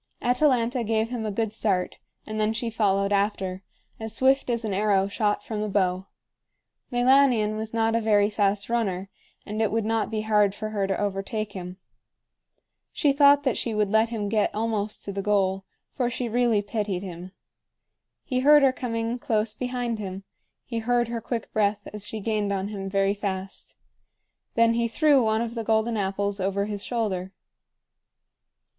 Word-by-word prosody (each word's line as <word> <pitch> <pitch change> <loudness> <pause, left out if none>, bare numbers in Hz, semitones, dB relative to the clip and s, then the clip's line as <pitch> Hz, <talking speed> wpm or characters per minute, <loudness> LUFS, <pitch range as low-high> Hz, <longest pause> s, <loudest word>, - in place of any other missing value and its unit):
Atalanta 250 -1 +2
gave 220 0 0
him 230 -3 -3
a - - -2
good 220 +1 -2
start, 195 -5 -1 0.3
and 215 0 -4
then 215 +1 +1
she 230 +1 -3
followed 200 -2 +1
after, 195 -2 0 0.4
as 220 0 -5
swift 265 +1 +3
as 235 -1 -1
an 210 - -2
arrow 195 -1 +2
shot 205 +1 0
from 215 -2 -4
the 215 - -2
bow. 190 -1 0 0.8
Meilanion 245 -3 +4
was 220 0 -4
not 225 0 +1
a 230 - +2
very 205 -2 +3
fast 205 -1 0
runner, 195 -5 -1 0.3
and 215 +1 -3
it 220 - +1
would 225 0 0
not 225 0 0
be 215 -1 -2
hard 210 -2 +2
for 215 +1 -4
her 200 -2 -1
to 195 - -1
overtake 205 +1 -2
him. 180 -1 -7 1.1
She 290 -3 +2
thought 285 0 +6
that 260 -4 0
she 230 -2 -2
would 210 -2 +1
let 220 +1 +3
him 215 -3 -3
get 210 0 +1
almost 215 -1 -2
to 200 - -4
the 195 0 -3
goal, 195 -1 +1 0.3
for 245 -2 -1
she 245 0 -3
really 230 -2 +2
pitied 200 -3 -2
him. 180 0 -8 0.9
He 255 -2 -1
heard 295 +2 +6
her 265 -1 +5
coming 230 -1 -3
close 215 -2 0
behind 245 -3 -3
him; 195 -1 -6 0.4
he 230 -3 -3
heard 240 +1 +1
her 235 -1 -3
quick 230 0 -4
breath 205 -1 0
as 210 -1 -6
she 220 - -5
gained 210 -1 -1
on 195 0 -2
him 195 -2 -5
very 195 0 +2
fast. 195 -2 -5 0.8
Then 230 0 +4
he 235 0 +1
threw 285 +2 +4
one 220 +1 +1
of 230 0 -5
the 230 -1 -3
golden 220 +1 +1
apples 200 0 -1
over 195 +1 0
his 205 -1 -5
shoulder. 195 -6 -2
215 Hz, 175 wpm, -25 LUFS, 200-230 Hz, 1.1 s, thought